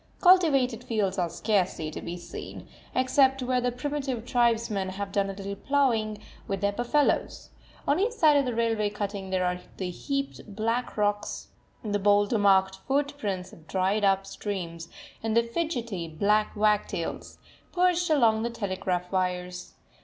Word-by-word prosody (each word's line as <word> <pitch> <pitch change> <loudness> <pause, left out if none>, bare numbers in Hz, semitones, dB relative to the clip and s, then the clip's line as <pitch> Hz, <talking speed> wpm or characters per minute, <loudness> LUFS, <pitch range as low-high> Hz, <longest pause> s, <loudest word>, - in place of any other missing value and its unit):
Cultivated 275 - +4
fields 205 -5 -1
are 175 -1 +1
scarcely 180 -4 0
to - - -6
be 175 +1 -5
seen, 170 - -9 0.3
except 265 +1 +3
where 250 0 +1
the 245 0 0
primitive 265 -2 -3
tribesmen 230 -6 +1
have 195 +1 -5
done 195 -1 +1
a - - -4
little 200 0 -5
ploughing 225 -4 +1 0.3
with 195 -1 -2
their 200 0 +2
buffaloes; 240 +7 0 0.4
on 290 +4 +3
each 445 +4 +1
side 315 -10 +5
of 280 -1 +3
the 245 -2 -2
railway 225 -2 +1
cutting 200 -2 -4
there 185 -1 +1
are 180 0 -1 0.2
the 185 -2 -3
heaped 275 - -3
up - - -12
black 230 +3 -1
rocks 205 0 -1 0.3
the 205 -2 -1
boulder 205 +2 +3
marked 190 -1 +4
footprints 270 -10 -1
of 160 -1 -16
dried 195 +4 +1
up 195 -1 +3
streams 170 -6 -5 0.3
and 225 0 0
the 235 - +5
fidgety, 235 - -3
black 205 +8 +1
wagtails, 210 -5 -1 0.3
perched 355 -1 +2
along 230 -8 +4
the 235 - -1
telegraph 185 -5 -3
wires. 180 -1 -2
210 Hz, 155 wpm, -27 LUFS, 190-250 Hz, 0.4 s, side